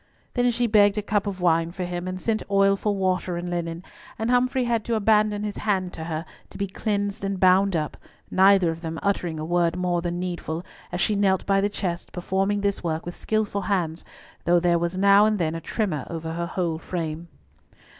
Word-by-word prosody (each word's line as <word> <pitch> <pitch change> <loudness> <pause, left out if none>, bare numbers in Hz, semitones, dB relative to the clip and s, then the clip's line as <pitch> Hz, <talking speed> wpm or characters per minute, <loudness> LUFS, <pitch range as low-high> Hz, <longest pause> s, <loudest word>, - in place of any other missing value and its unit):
Then 245 -1 +2
she 240 0 +1
begged 210 -2 +4
a 210 - -1
cup 205 0 0
of 190 -2 -4
wine 165 -1 +3
for 180 +2 -5
him, 175 0 -4
and 185 0 -4
sent 220 +2 0
Oil 195 0 +4
for 205 +1 -1
water 185 -2 0
and 175 +1 -4
linen, 170 0 -3 0.3
and 225 +2 -1
Humfrey 255 +1 +2
had 235 -2 0
to 235 - 0
abandon 210 -1 +2
his 210 -1 -4
hand 190 -4 -1
to 160 - -6
her, 160 0 -3 0.2
to - - -11
be 200 - -1
cleansed 205 +1 -2
and 195 -1 -2
bound 190 +1 +4
up, 155 -2 -2 0.4
neither 190 -2 +5
of 165 0 -7
them 165 -1 -4
uttering 175 -5 -1
a 155 - -3
word 170 0 +1
more 180 -1 0
than 175 0 -3
needful, 175 -2 -4 0.3
as 175 - -3
she 210 - +2
knelt 195 -2 +2
by 195 0 +3
the 205 - +1
chest 180 -4 -4
performing 195 +3 0
this 200 -2 -1
work 160 -1 -2
with 175 - -6
skilful 215 -2 -1
hands, 175 -4 -1 0.4
though 175 +1 +4
there 170 0 +2
was 170 +2 -2
now 200 +2 +6
and 215 -1 +1
then 160 -4 0
a 165 - -5
tremor 180 - -2
over 165 -1 -4
her 170 +1 -3
whole 170 -3 -2
frame. 165 -1 -4
185 Hz, 215 wpm, -25 LUFS, 170-205 Hz, 0.4 s, now